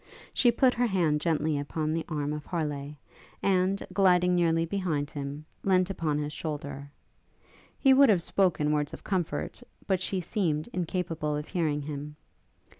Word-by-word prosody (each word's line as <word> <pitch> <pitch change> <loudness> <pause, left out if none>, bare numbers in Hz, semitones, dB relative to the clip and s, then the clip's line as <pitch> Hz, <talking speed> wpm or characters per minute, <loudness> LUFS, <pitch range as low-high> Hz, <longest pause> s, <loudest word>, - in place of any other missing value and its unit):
She 245 - +4
put 250 +1 +3
her 245 0 +1
hand 165 -7 +1
gently 155 -2 +1
upon 155 +2 -2
the 165 0 -1
arm 150 -2 -2
of 150 0 -5
Harleigh, 150 -4 -3 0.5
and, 190 0 +2
gliding 180 -2 +4
nearly 165 -2 +2
behind 165 -6 -2
him, 145 +1 -6 0.2
leant 185 -1 +3
upon 155 -5 -1
his 150 0 -3
shoulder. 145 -2 -5 0.9
He 270 -2 +5
would 275 -1 +7
have 185 -6 +4
spoken 170 -7 +2
words 150 -1 0
of - - -15
comfort, 185 -5 -2 0.2
but 190 -2 +1
she 190 0 -1
seemed 165 -4 -1
incapable 165 -4 -2
of 150 +1 -4
hearing 155 -5 0
him. 150 0 -6
165 Hz, 155 wpm, -28 LUFS, 150-185 Hz, 0.9 s, would